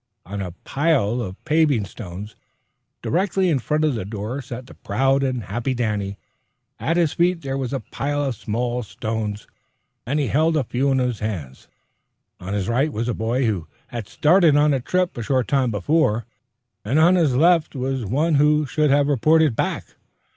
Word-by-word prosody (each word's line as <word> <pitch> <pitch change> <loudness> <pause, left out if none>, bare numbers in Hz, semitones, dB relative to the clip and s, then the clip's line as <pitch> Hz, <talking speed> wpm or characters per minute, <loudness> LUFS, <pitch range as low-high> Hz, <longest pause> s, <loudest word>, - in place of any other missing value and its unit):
On 100 +2 -5
a 90 -3 -5
pile 135 -6 +1
of 95 -4 -6
paving 150 -9 +2
stones 100 +1 -9 0.7
directly 185 +1 +1
in 150 -5 +2
front 150 +5 0
of 150 - +2
the 110 - -3
door 110 +6 -5
sat 125 0 -8
the - - -13
proud 135 +1 +1
and 130 -4 -1
happy 120 +7 -2
Danny. 105 -4 -2 0.6
At 165 - 0
his 170 -4 +2
feet 175 0 +1
there 135 -1 -3
was 130 -2 -3
a 135 - -2
pile 145 +1 -2
of 135 -3 -1
smaller 120 +4 -2
stones, 110 -1 -4 0.6
and 145 +4 0
he 145 - +1
held 160 +4 +2
a 145 - +1
few 130 +4 0
in 135 - +2
his 125 -3 0
hands. 85 -12 -5 0.7
On 95 +3 -4
his 100 -2 -1
right 135 +6 +1
was 115 0 -2
a - - 0
boy 120 +4 0
who 95 -8 -1 0.2
had 115 -4 -6
started 165 -1 +4
on 145 0 +4
a 135 - +1
trip 180 +7 0
a 120 - -4
short 130 +2 0
time 135 -3 +2
before, 115 - +1 0.6
and 125 +8 0
on 165 +3 +6
his 160 -8 +3
left 165 +2 +3
was 130 -1 -2
one 145 - +1
who 150 0 +3
should 150 +2 +1
have 140 +1 +3
reported 155 0 +3
back. - - -1
130 Hz, 185 wpm, -22 LUFS, 110-150 Hz, 0.7 s, on